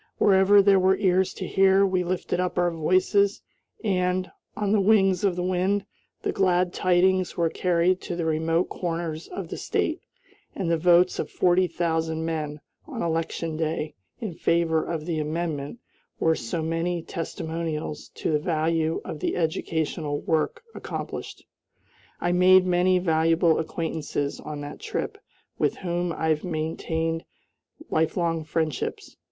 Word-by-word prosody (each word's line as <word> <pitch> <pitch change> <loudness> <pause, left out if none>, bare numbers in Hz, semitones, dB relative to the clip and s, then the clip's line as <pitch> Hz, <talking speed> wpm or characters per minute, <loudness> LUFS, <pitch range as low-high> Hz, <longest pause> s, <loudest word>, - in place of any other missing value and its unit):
Wherever 200 +1 +5
there 195 -1 +5
were 190 +1 +3
ears 185 0 +2
to - - -5
hear, 195 0 +4
we 185 -1 +1
lifted 180 0 -2
up 180 -1 -1
our 175 -1 +2
voices, 185 +5 +2 0.4
and, 185 -2 0 0.3
on 205 -2 0
the 210 -1 +4
wings 195 -3 +3
of 195 -3 +2
the 180 - -2
wind, 185 +2 0 0.4
the - - 0
glad 180 -2 +2
tidings 185 0 +2
were 165 -2 +1
carried 180 +1 +1
to 180 - -4
the 170 -1 -2
remote 160 +2 +1
corners 165 -2 -4
of 360 - -6
the - - -5
State, - - -1 0.5
and 175 -4 -1
the 165 - +3
votes 175 +2 +4
of - - -2
forty 180 +1 +3
thousand 160 -2 -1
men, 155 -2 -3 0.3
on 260 -7 -4
election 165 0 -2
day, 160 -1 -2 0.3
in 215 -6 -4
favor 165 -1 +1
of 160 -3 -4
the 165 -2 -1
amendment 155 +1 -3 0.4
were 160 - +3
so 160 +4 -3
many 165 +1 -1
testimonials 160 -2 -4
to - - -2
the 150 - +2
value 160 0 0
of 155 - -6
the - - -1
educational 160 -2 -1
work 465 - -1
accomplished. - - -6 0.7
I 175 - 0
made 185 +1 +6
many 180 +1 +3
valuable 165 -1 +3
acquaintances, 160 -3 -3
on 150 -1 -6
that 145 +1 -7
trip, - - -4 0.4
with - - +1
whom 175 -1 -2
I 160 -1 -1
have 155 -1 +1
maintained 165 0 -2 0.7
lifelong 165 0 0
friendships. 155 -2 -3
170 Hz, 145 wpm, -25 LUFS, 160-185 Hz, 0.7 s, made